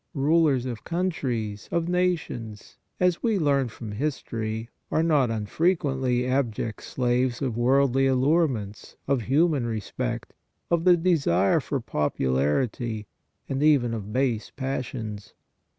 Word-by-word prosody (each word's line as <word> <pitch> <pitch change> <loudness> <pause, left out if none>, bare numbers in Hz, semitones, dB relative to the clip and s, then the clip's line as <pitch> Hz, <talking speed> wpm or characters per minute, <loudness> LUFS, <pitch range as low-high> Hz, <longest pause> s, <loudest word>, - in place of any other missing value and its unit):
Rulers 145 -2 +3
of 120 -3 -5
countries, 130 - -2
of 170 -1 0
nations, 165 - -2 0.2
as 180 -2 +2
we 225 -4 +1
learn 140 -6 +2
from 110 -1 -8
history, 115 -3 -3 0.2
are 160 - +1
not 150 -7 +3
un 110 -2 -2
frequently 135 - +1
abject 125 -4 -1
slaves 125 0 0
of 130 -5 -2
worldly 135 +2 +3
allurements, 130 - 0
of 135 -3 +2
human 140 +1 +2
respect, 110 -3 -4 0.4
of 170 0 +2
the 180 -1 +7
desire 155 - +3
for 140 -1 -2
popularity 100 - -1 0.4
and 135 +1 -2
even 140 -6 +4
of 105 -2 -5
base 125 -2 0
passions. 125 -6 -5
130 Hz, 120 wpm, -26 LUFS, 115-155 Hz, 0.4 s, the